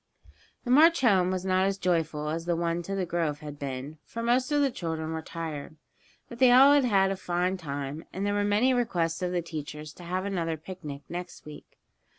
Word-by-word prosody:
The 245 - -2
march 325 +4 +6
home 190 -7 +4
was 185 0 -2
not 185 0 +2
as 195 0 -1
joyful 160 -5 0
as 165 +2 -3
the 175 -1 +1
one 170 0 -1
to 195 +3 -4
the 190 -2 -1
grove 165 -4 -2
had 145 -1 -8
been, 140 +2 -6
for 230 - -6
most 250 +3 +2
of 295 - +3
the 280 -2 +2
children 160 -5 -4
were 160 0 -3
tired. 160 -2 -6 0.5
But 235 - -11
they 255 -2 +6
all 270 +3 +8
had 285 -3 +4
had 195 -4 +3
a - - -1
fine 180 0 -1
time, 145 -2 -5
and 195 +2 -3
there 205 - 0
were 205 0 +1
many 210 +6 +3
requests 175 -10 0
of 180 -1 -1
the 175 -1 -1
teachers 150 -2 -7
to 180 - -13
have 185 +2 -2
another 170 -5 -2
picnic 155 -4 -8
the - - -9
next 180 0 -7
week. 150 -1 -12
175 Hz, 220 wpm, -28 LUFS, 160-205 Hz, 0.5 s, all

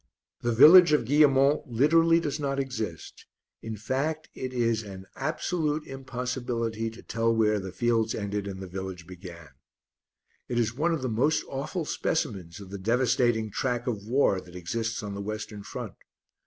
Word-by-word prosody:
The 120 - 0
village 155 +7 +8
of 150 - +3
Guillemont 140 +1 +4
literally 165 +7 +4
does 150 -2 -3
not 140 -1 -1
exist, 110 - -5 0.3
in 110 -1 -6
fact, 140 +8 -2
it 130 -1 -5
is 115 -3 +1
an 95 -3 -9
absolute 155 +1 -1
impossibility 125 -4 -3
to 110 - -13
tell 115 0 0
where 105 -2 +2
the 95 -1 -6
fields 115 +2 +1
ended 100 -1 -3
and 95 -1 -6
the 95 - -6
village 95 -2 -6
began. 85 -3 -11 1.0
It 120 - -2
is 115 -1 +1
one 155 +7 0
of 160 -5 -2
the - - 0
most 130 +7 +1
awful 155 +5 -4
specimens 95 - -2
of 95 -2 -11
the 100 - -6
devastating 115 0 +1
track 120 +2 -1
of 105 -4 -3
war 115 -6 +2
that 90 -1 -15
exists 110 +6 -3
on 100 -1 -5
the 100 - -5
Western 110 0 -5
Front. - - -7
115 Hz, 165 wpm, -27 LUFS, 105-135 Hz, 1.0 s, village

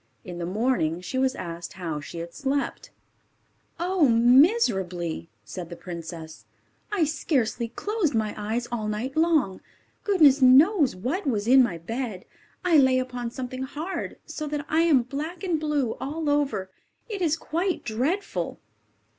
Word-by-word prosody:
In 175 -2 -7
the 170 - -3
morning 190 -5 0
she 185 +9 -3
was 265 0 +1
asked 170 0 -6
how 165 -4 -4
she 145 +3 -9
had 170 0 -6
slept. 275 0 -2 0.9
"Oh, 350 -4 +2
miserably!" 230 - +3 0.2
said 165 - -7
the 170 - -7
princess. 165 -7 -8 0.5
"I 400 -5 +2
scarcely 260 -6 0
closed 370 - -1
my 215 -1 0
eyes 220 +3 -3
all 220 -3 -2
night 220 +6 -3
long. 315 - +2 0.4
Goodness 300 -9 +5
knows 280 - +6
what 265 - -3
was 215 -5 0
in 260 +2 +7
my 210 -9 +1
bed. 215 +2 -5 0.4
I 340 -3 +5
lay 260 -2 +5
upon 250 -2 -3
something 255 +1 -6
hard, 300 +8 -5
so 305 - -5
that 295 0 -3
I 320 +2 +2
am 305 -7 +4
black 300 - -5
and 345 -5 0
blue 295 -6 0
all 300 +2 -2
over. 275 -10 0 0.4
It 415 -4 -5
is 320 -2 +2
quite 345 +4 -2
dreadful!" 270 - -2
255 Hz, 150 wpm, -26 LUFS, 200-310 Hz, 0.9 s, in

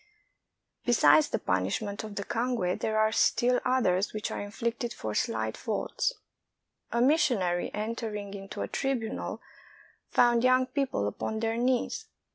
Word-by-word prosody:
Besides 155 -11 +5
the - - 0
punishment 100 - -1
of 215 -1 -7
the 200 - -2
cangue, 230 -5 -1
there 215 0 -1
are 215 0 +3
still 245 +2 +3
others 205 -7 +1
which 215 +1 -3
are - - -3
inflicted 230 +3 -3
for 110 -1 -4
slight 110 0 -1
faults. 220 - -1 0.8
A 235 - +1
missionary 245 - +2
entering 210 -2 -4
into 195 -1 -6
a - - -3
tribunal 250 -5 -3 0.7
found 240 -1 +4
young 255 0 +4
people 260 - -1
upon 220 - -3
their 225 0 0
knees. 245 +1 0
220 Hz, 135 wpm, -29 LUFS, 195-245 Hz, 0.8 s, Besides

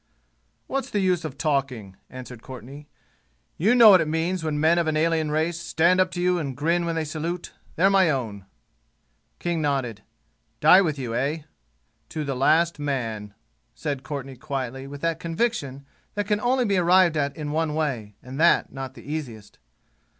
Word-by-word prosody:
"What's 275 0 -3
the 205 - -1
use 185 -3 +1
of 145 -4 -6
talking?" 130 - -2
answered 125 -2 -10
Courtenay. 130 +4 -10 0.7
"You 215 +9 +3
know 230 -3 +9
what 185 -3 +7
it - - -1
means 165 +3 -1
when 155 -2 -1
men 165 +3 +4
of 170 - 0
an 155 -1 +1
alien 160 -1 +1
race 160 +2 0
stand 170 +2 +2
up 185 - +2
to 175 - -4
you 180 0 +2
and 135 -5 -4
grin 170 +4 +1
when 165 - -1
they 160 -1 -1
salute. 165 +3 -4 0.2
They're 190 +4 +4
my 190 -3 +4
own." 110 -9 -3 0.9
King 170 -2 -2
nodded. 130 -7 -1 0.6
"Die 180 +5 +7
with 155 -6 -1
you, 125 -4 -4
eh?" 145 +6 -1 0.7
"To 155 - -4
the 140 -2 -3
last 160 +5 +2
man," 115 -8 -3 0.4
said 140 +1 -3
Courtenay 135 -2 -6
quietly 135 0 -5
with 145 0 -9
that 165 -1 -1
conviction 165 - -2 0.3
that 205 0 -1
can 210 0 +1
only 250 +1 +2
be 200 -3 +1
arrived 180 -1 +4
at 140 0 -1
in 150 -2 -4
one 155 0 -1
way, 125 -10 -2
and 130 +3 -8
that 170 +1 +4
not 135 -1 -6
the - - -12
easiest. 135 -8 -6
155 Hz, 180 wpm, -24 LUFS, 135-170 Hz, 0.9 s, know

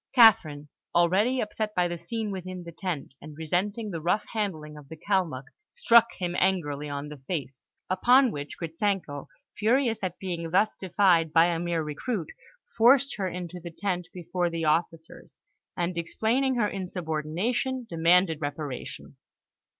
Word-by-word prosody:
Catherine, 190 - +5 0.3
already 195 +9 +3
upset 215 0 -3
by 180 -1 +2
the 175 -1 -5
scene 215 +5 -4
within 185 -1 -6
the 170 - -9
tent, 170 -6 -5
and 150 0 -11
resenting 200 +7 -2
the 165 -3 -4
rough 180 +6 +1
handling 160 -9 -3
of 145 -2 -13
the 160 - -9
Kalmuk, 175 -8 -1 0.3
struck 235 - +5
him 175 -2 -3
angrily 150 -6 0
on 145 +1 -5
the 150 - -9
face, 135 -2 -6 0.2
upon 245 +7 +4
which 145 -4 -6
Gritzenko, 165 -3 -2 0.3
furious 230 +1 +2
at 185 -3 -3
being 170 -3 -4
thus 195 +5 +3
defied 180 -4 +3
by 165 +1 +6
a 170 -1 0
mere 170 -1 -1
recruit, 160 - -4 0.4
forced 265 +4 +5
her 195 -2 -1
into 180 0 -6
the 170 0 -8
tent 180 0 -3
before 180 0 -2
the 165 -1 -3
officers, 160 +1 -2 0.4
and, 175 0 -1
explaining 235 +10 0
her 235 -3 +2
insubordination, 185 - -2
demanded 165 -1 +3
reparation. 145 -2 -6
175 Hz, 150 wpm, -27 LUFS, 160-210 Hz, 0.4 s, by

